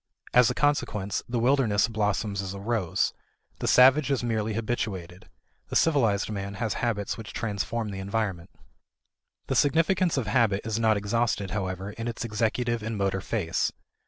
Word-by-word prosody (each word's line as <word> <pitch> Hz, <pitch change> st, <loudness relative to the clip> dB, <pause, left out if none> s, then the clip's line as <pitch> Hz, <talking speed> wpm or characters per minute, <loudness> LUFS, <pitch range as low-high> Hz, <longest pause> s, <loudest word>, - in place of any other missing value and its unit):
As 125 Hz, -1 st, +6 dB
a -, -, -2 dB
consequence, 105 Hz, -9 st, 0 dB
the 120 Hz, -, -1 dB
wilderness 115 Hz, -4 st, +3 dB
blossoms 105 Hz, -2 st, -1 dB
as 95 Hz, 0 st, -5 dB
a -, -, -7 dB
rose. 105 Hz, -4 st, 0 dB, 0.5 s
The -, -, -2 dB
savage 135 Hz, +3 st, +6 dB
is 135 Hz, -3 st, 0 dB
merely 110 Hz, -2 st, -1 dB
habituated; 95 Hz, -6 st, -4 dB, 0.4 s
the -, -, -6 dB
civilized 115 Hz, -11 st, +2 dB
man 100 Hz, -1 st, -4 dB
has 110 Hz, 0 st, -1 dB
habits 110 Hz, -3 st, -1 dB
which 105 Hz, -3 st, -8 dB
transform 110 Hz, 0 st, -2 dB
the 95 Hz, -1 st, -5 dB
environment. 95 Hz, -3 st, -2 dB, 1.0 s
The -, -, -2 dB
significance 165 Hz, +4 st, +2 dB
of 130 Hz, -, 0 dB
habit 105 Hz, -2 st, +2 dB
is 110 Hz, 0 st, -1 dB
not 110 Hz, -2 st, +3 dB
exhausted, 105 Hz, -1 st, -1 dB
however, 95 Hz, -1 st, -3 dB
in 115 Hz, +3 st, -6 dB
its 120 Hz, +1 st, -4 dB
executive 115 Hz, +2 st, -1 dB
and 110 Hz, 0 st, -4 dB
motor 95 Hz, -1 st, 0 dB
phase. 95 Hz, -5 st, -1 dB
110 Hz, 160 wpm, -27 LUFS, 100-120 Hz, 1.0 s, As